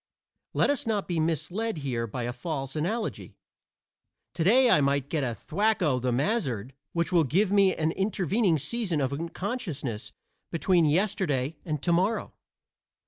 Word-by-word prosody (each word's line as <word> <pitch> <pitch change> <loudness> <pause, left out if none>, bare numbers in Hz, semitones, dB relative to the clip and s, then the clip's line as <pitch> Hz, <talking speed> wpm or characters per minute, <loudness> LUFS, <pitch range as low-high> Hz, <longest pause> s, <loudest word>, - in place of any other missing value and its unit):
Let - - +3
us 280 -5 -2
not 210 -3 0
be 175 -2 -1
misled 175 +7 -1
here 125 -5 -2
by 120 +3 -4
a 120 +1 -3
false 135 -3 -4
analogy. 210 +9 -3 1.0
Today 215 +10 +4
I 190 -11 +5
may 140 0 +3
get 140 +2 -2
a 120 -3 -2
thwack 205 - 0
o' 135 -6 +2
the 125 0 0
mazzard 135 - -1 0.2
which 170 +1 0
will 170 -2 +4
give 185 - +1
me 200 -2 +4
an 160 0 0
intervening 195 -1 +1
season 190 - -1
of 135 -1 0
unconsciousness 165 - -4 0.4
between 170 0 +2
yesterday 155 -4 +1
and 150 -4 -3
to 170 - +1
morrow. 190 +6 +1
165 Hz, 150 wpm, -27 LUFS, 140-200 Hz, 1.0 s, I